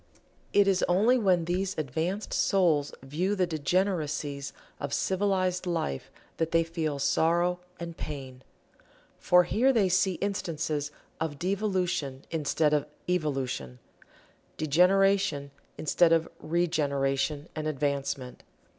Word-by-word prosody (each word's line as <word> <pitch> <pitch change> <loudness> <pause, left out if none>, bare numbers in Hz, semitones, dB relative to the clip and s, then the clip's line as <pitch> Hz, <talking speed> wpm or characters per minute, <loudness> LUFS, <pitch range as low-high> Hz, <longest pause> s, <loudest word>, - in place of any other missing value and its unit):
It 205 -1 +4
is 190 -2 +2
only 215 +8 +4
when 185 -6 +2
these 185 +2 -1
advanced 160 - -2
souls 165 -7 +2
view 175 +9 -1
the 185 -2 +2
degeneracies 155 -4 -1 0.3
of 140 -1 -2
"civilized" 185 -2 0
life 160 - -2 0.3
that 165 -1 0
they 165 0 +3
feel 160 -3 -3
sorrow 170 +5 +2 0.2
and 170 -1 -6
pain. 135 -5 -7 0.8
For 180 0 +5
here 235 +9 +3
they 215 -7 +3
see 185 +1 +2
instances 160 -6 -2 0.3
of 160 -3 -3
devolution 180 -7 -1
instead 155 -1 +1
of 150 -1 +1 0.2
evolution 135 - -2 0.8
degeneration 180 -1 +3 0.3
instead 165 +2 +3
of 165 0 +3
regeneration 145 -3 0
and 155 -1 -3
advancement. 140 -3 -2
165 Hz, 110 wpm, -28 LUFS, 145-185 Hz, 0.8 s, For